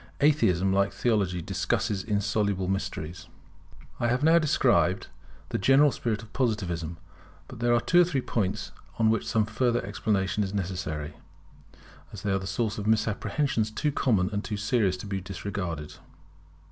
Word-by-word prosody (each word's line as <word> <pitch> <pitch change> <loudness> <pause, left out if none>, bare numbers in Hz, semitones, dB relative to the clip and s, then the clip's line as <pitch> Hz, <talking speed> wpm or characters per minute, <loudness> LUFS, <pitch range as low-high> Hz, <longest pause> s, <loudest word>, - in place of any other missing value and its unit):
Atheism, 95 - +3
like 100 0 +2
Theology, 100 -7 0
discusses 95 +2 -1
insoluble 100 -2 0
mysteries] 90 -3 -4 0.7
I 120 - +1
have 125 +4 +1
now 165 +2 +6
described 95 - +2 0.4
the - - -2
general 135 +7 +5
spirit 115 -2 -2
of 110 - -15
Positivism. 90 - -1 0.5
But - - -10
there 120 0 +2
are - - +4
two 175 +8 +4
or - - +7
three 145 -6 -1
points 105 -4 -2 0.3
on 110 -1 +4
which 115 - -1
some 110 -2 +2
further 120 +2 0
explanation 105 0 0
is 100 +1 -4
necessary, 90 -6 -3 0.9
as 100 - -9
they 105 - 0
are 95 - +1
the 95 - -6
source 105 +2 -1
of 105 - -4
misapprehensions 110 +2 +1
too 145 +7 -1
common 105 -9 +1
and 100 +1 -1
too 105 - -4
serious 100 -3 +1
to 90 - -8
be 95 -1 -3
disregarded. 90 -4 -5
105 Hz, 160 wpm, -27 LUFS, 95-115 Hz, 0.9 s, or